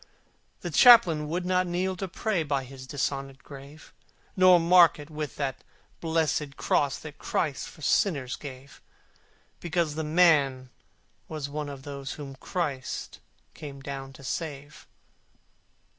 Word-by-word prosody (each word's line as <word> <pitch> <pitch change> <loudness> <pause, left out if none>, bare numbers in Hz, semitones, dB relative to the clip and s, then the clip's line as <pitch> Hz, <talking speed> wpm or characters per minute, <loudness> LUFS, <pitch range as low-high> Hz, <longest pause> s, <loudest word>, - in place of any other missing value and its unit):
The - - -4
Chaplain 175 - +7
would 175 +2 -2
not 185 0 +1
kneel 185 +2 -1
to 195 - -3
pray 195 0 -1
By 140 -3 -1
his 130 0 -11
dishonoured 135 -1 -3
grave: 140 +2 -13 0.4
Nor 185 -1 +7
mark 170 -1 +6
it 150 +1 -11
with 150 -1 -5
that 135 -2 -3 0.4
blessed 160 -3 -1
Cross 140 -2 +1
That 150 -2 -10
Christ 150 -5 -2
for 155 - -14
sinners 140 -4 +1
gave, 135 -1 -11 0.8
Because 170 -2 -1
the 160 +1 -3
man 150 -6 +3 0.6
was 150 -3 -5
one 150 0 -4
of 140 -2 -9
those 140 -1 -6
Whom 140 -2 -8
Christ 145 -5 -4 0.3
came 145 -3 -9
down 135 -1 -7
to 135 - -14
save. 145 0 -6
150 Hz, 135 wpm, -27 LUFS, 140-170 Hz, 0.8 s, Chaplain